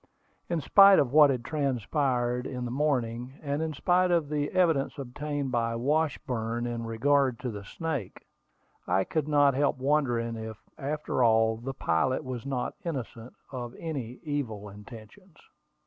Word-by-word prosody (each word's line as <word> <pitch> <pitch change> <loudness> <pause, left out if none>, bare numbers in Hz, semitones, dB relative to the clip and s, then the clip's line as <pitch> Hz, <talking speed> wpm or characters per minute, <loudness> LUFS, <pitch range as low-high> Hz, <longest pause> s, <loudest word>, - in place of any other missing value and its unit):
In 170 -2 0
spite 195 +4 +7
of 135 -2 +2
what 150 -1 +8
had 125 -3 -1
transpired 130 -3 0
in 125 -2 -4
the 120 - -4
morning, 125 -3 -1
and 145 +1 -1
in 160 -1 -1
spite 180 +5 +2
of 170 -4 +1
the 150 -1 -1
evidence 165 -6 +1
obtained 140 +1 -4
by 115 -1 0
Washburn 125 -4 -1
in 115 -1 -4
regard 130 +2 +2
to 125 -2 -3
the 100 -2 -7
snake, 140 - -5 0.6
I 95 +2 +2
could 150 - -2
not 145 -2 +4
help 140 +1 +1
wondering 125 -5 0
if, 110 -1 -6 0.2
after 145 -2 -1
all, 110 -1 +4
the 135 +4 -6
pilot 85 +6 0
was 130 0 -6
not 130 -3 -2
innocent 125 -7 -5 0.2
of 120 -3 -6
any 130 -7 -5
evil 120 -9 -3
intentions. 110 - -13
130 Hz, 150 wpm, -28 LUFS, 115-150 Hz, 0.6 s, what